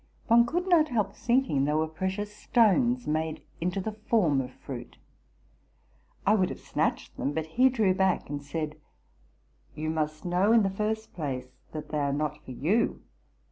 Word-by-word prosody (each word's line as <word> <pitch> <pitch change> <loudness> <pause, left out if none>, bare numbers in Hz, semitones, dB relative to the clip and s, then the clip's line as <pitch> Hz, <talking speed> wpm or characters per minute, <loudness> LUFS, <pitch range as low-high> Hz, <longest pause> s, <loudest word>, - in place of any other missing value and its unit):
One 235 +1 +5
could 350 +8 -1
not 335 -4 +5
help 220 -6 0
thinking 235 - +1
they 150 +1 +1
were 155 +1 +2
precious 190 +6 -3
stones 240 +3 +3
made 155 +1 -2 0.2
into 180 +3 -1
the 215 +3 -3
form 210 - +1
of 125 - -6
fruit. 125 -3 -9 1.3
I 205 - +5
would 190 -4 +3
have - - -6
snatched - - -2
them; 140 - -1
but 160 0 -2
he 250 +11 +4
drew 220 -7 +2
back, 190 0 +1
and 145 0 -4
said, 150 +1 -4 0.5
'' - - -36
You 155 +1 -2
must 155 0 -2
know, 180 +5 +3
in 230 -2 +6
the 195 - +1
first 215 +2 -2
place, 130 -6 -4 0.2
that 155 -1 -6
they 150 - -1
are 140 -1 0
not 150 +1 -2
for - - -13
you. 165 - 0
185 Hz, 180 wpm, -28 LUFS, 150-220 Hz, 1.3 s, in